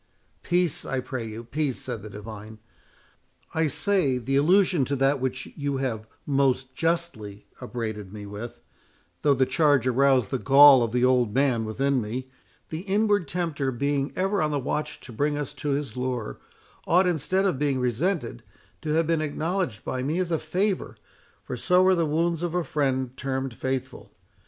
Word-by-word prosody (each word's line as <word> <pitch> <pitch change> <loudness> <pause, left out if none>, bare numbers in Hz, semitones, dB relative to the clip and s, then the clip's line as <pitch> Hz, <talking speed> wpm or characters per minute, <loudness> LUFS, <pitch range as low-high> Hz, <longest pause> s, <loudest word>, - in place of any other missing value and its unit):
"Peace, 175 -3 +1
I 135 - -2
pray 125 -2 -5
you, 110 +1 -7
peace," 140 +2 -2
said 120 -5 -5
the 110 - -9
divine; 105 +1 -9 1.0
"I 160 0 +2
say, 155 -4 +1
the 130 +3 -2
allusion 175 +2 +4
to 140 - -1
that 135 +1 +2
which 130 0 -3
you 140 -2 -2
have 115 -5 -3 0.2
most 135 -2 +1
justly 165 -12 -2 0.2
upbraided 110 -5 -5
me 105 -1 -8
with—though 105 - -5
the 130 0 +3
charge 145 -2 +3
aroused 130 -3 +3
the 130 - 0
gall 140 -1 +8
of 115 -2 0
the 125 +1 +2
old 125 -4 +2
man 130 -5 +2
within 135 +4 0
me, 125 +5 -5 0.4
the 160 - -4
inward 205 -1 +1
tempter 155 -5 -2
being 140 +2 -1
ever 195 +1 0
on 155 - +1
the 145 - -1
watch 150 +3 -3
to - - -11
bring 145 +5 0
us 145 -3 -4
to 145 - -4
his 140 0 -2
lure—ought, 125 - -2
instead 180 +3 +1
of 180 -9 0
being 140 -3 +1
resented, 125 - -1 0.4
to 155 -1 -2
have 165 0 +3
been 165 0 +1
acknowledged 155 - -2
by 130 - -2
me 150 +6 -1
as 180 -2 -1
a 165 - +1
favour, 185 +5 -1 0.5
for - - -5
so 180 0 +3
are 190 - +5
the 170 -3 +1
wounds 165 +2 0
of 175 -1 -2
a 180 - +1
friend 130 -4 -1
termed 130 -1 -3
faithful. 130 +2 -4
140 Hz, 170 wpm, -26 LUFS, 125-160 Hz, 1.0 s, gall